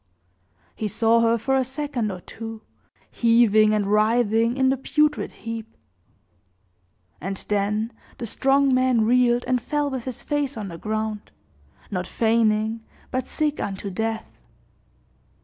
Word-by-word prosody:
He 215 - -2
saw 225 +2 +3
her 230 0 +3
for 265 +4 0
a 265 - +3
second 260 -4 -3
or 180 -1 -7
two, 225 +2 -8 0.5
heaving 230 -2 +4
and 210 -1 +1
writhing 225 +3 +2
in 265 -1 +3
the 265 - +3
putrid 300 +3 +1 0.2
heap; 225 -1 -6 1.4
and 190 +4 -3
then 210 +3 0 0.2
the 235 - -5
strong 270 +4 +2
man 255 -3 +3
reeled 245 +1 +3
and 250 -1 +1
fell 295 0 -1
with 260 -3 -4
his 255 -3 -5
face 290 -3 -1
on 205 -3 -5
the 165 -1 -8
ground, 215 -1 -3 0.6
not 180 -2 -2
feigning, 220 -1 +1 0.3
but 255 0 -2
sick 300 -1 -1
unto 195 0 -4
death. 225 +3 -2
230 Hz, 135 wpm, -24 LUFS, 215-255 Hz, 1.4 s, heaving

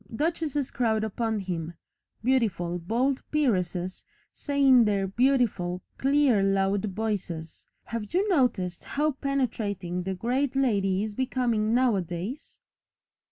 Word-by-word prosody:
Duchesses 295 +1 -1
crowd 220 -3 +1
upon 220 0 -1
him, 170 -3 -4 0.5
beautiful, 200 -9 +1
bold 245 +10 0
peeresses 185 - 0 0.3
say 280 -1 0
in 255 -3 +7
their 200 -2 +1
beautiful, 200 -5 +1 0.2
clear 275 -5 +3
loud 195 0 +1
voices 190 -6 -4 0.2
have 230 -3 -5
you 385 +4 +1
noticed 240 - +1
how 300 +2 0
penetrating 215 -10 -2
the 190 +1 -3
great 250 +7 -1
lady 200 -7 +2
is 215 -1 -4
becoming 235 -3 0
nowadays? 205 - -1
220 Hz, 115 wpm, -27 LUFS, 190-260 Hz, 0.5 s, in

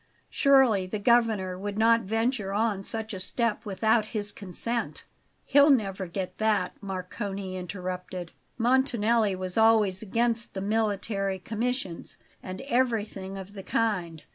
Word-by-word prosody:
Surely 260 -9 +4
the 215 - -3
Governor 210 -5 +2
would 205 +1 -4
not 230 +1 +4
venture 225 -1 -1
on 210 -2 0
such 220 +1 -2
a 190 - -5
step 230 +4 -1
without 220 +3 +2
his 210 -1 -2
consent?" 230 +5 -2 0.4
"He'll 285 +2 +6
never 195 -8 +1
get 185 +2 -5
that," 215 -4 +1
Marcone 195 0 -5
interrupted. 180 -1 -5 0.3
"Montanelli 235 -4 +2
was 185 +2 -2
always 215 -4 +4
against 230 +2 -1
the - - -2
military 200 -2 -1
commissions, 225 -1 -4 0.2
and 185 0 -7
everything 220 -7 -1
of 195 +1 -9
the 200 - -7
kind. 185 -7 -1
210 Hz, 130 wpm, -27 LUFS, 190-230 Hz, 0.4 s, He'll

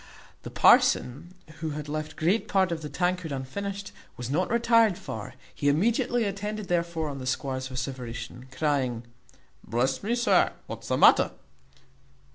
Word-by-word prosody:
The - - -8
parson, 150 +9 +3 0.2
who 160 -1 -3
had 150 -1 -6
left 155 +1 -4
great 180 +8 +1
part 190 -2 +2
of 165 -1 -3
the 150 - -6
tankard 180 -2 -1
unfinished, 195 +10 -5 0.3
was 125 +1 -5
not 175 +5 +1
retired 230 -4 +4
far; 130 - -7 0.2
he 145 - +1
immediately 235 - +2
attended 205 0 -4
therefore 170 -2 0
on 140 -2 -5
the 130 - -6
squire's 130 0 -2
vociferation, 125 -1 -6
crying, 130 -5 -1 0.6
"Bless 130 +3 0
me! 230 +4 0
sir, 240 0 +3
what's - - -8
the - - +1
matter?" - - +6
160 Hz, 145 wpm, -27 LUFS, 130-200 Hz, 0.6 s, matter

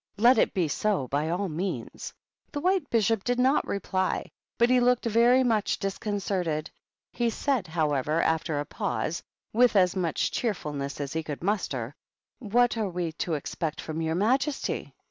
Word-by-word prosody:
"Let 235 +3 +6
it - - +2
be 180 -4 +2
so, 185 -2 0
by 145 +3 0
all 185 +4 -1
means." 180 +4 -4 0.4
The 290 - -3
White 365 -1 +1
Bishop 225 -2 +2
did 245 0 0
not 260 +3 +3
reply, 190 -1 -1 0.3
but 235 +1 +4
he 255 - +5
looked 245 0 +2
very 235 +3 +5
much 225 -4 +1
disconcerted; 195 -5 -2 0.4
he 240 -1 +1
said, 245 -3 -1
however, 155 -2 0
after 160 -2 +1
a 145 - -2
pause, 170 - -2 0.3
with 245 0 +4
as 180 -2 +4
much 170 -5 0
cheerfulness 150 - -3
as 145 +1 -4
he 160 - -1
could 155 0 -6
muster, 145 - -1 0.5
"What 240 +1 +2
are 215 -3 0
we 175 -2 -2
to 175 -7 0
expect 155 +2 -4
from 160 +1 -4
your 160 0 0
majesty 260 - 0
195 Hz, 165 wpm, -27 LUFS, 160-235 Hz, 0.5 s, Let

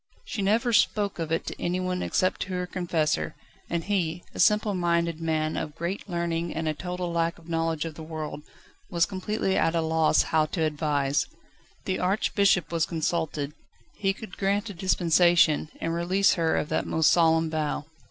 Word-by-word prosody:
She 205 - -4
never 225 +4 +2
spoke 210 -4 +2
of 165 -1 -3
it 165 - 0
to - - -7
anyone 180 +1 -1
except 185 - 0
to 185 - -3
her 180 0 -1
confessor, 160 - -1 0.3
and 170 -1 -1
he, 175 -4 -1
a - - -8
simple 210 -1 +4
minded 170 -2 0
man 155 -1 0
of 150 -1 -4
great 180 +4 -4
learning 170 -1 -2
and 160 0 -2
a 155 - +1
total 180 +2 -4
lack 170 0 0
of 170 -1 -17
knowledge 165 -1 -1
of 165 - -5
the 160 - -10
world, 155 -2 -6 0.5
was 170 -4 +2
completely 190 +1 -2
at 165 - +2
a 165 - +2
loss 160 0 +3
how 155 -1 +1
to 165 +1 -2
advise. 145 -2 0 0.6
The 185 - -1
Archbishop 195 -1 +2
was 165 -1 +1
consulted. 160 -3 -2 0.4
He 195 -2 +1
could 195 0 -9
grant 205 +2 0
a - - -8
dispensation, 170 -3 +3
and 165 - -2
release 185 +4 +3
her 165 -2 +1
of 150 - -1
that - - -1
most 160 -1 +3
solemn 165 -1 +3
vow. 155 -2 -2
170 Hz, 180 wpm, -26 LUFS, 160-185 Hz, 0.6 s, simple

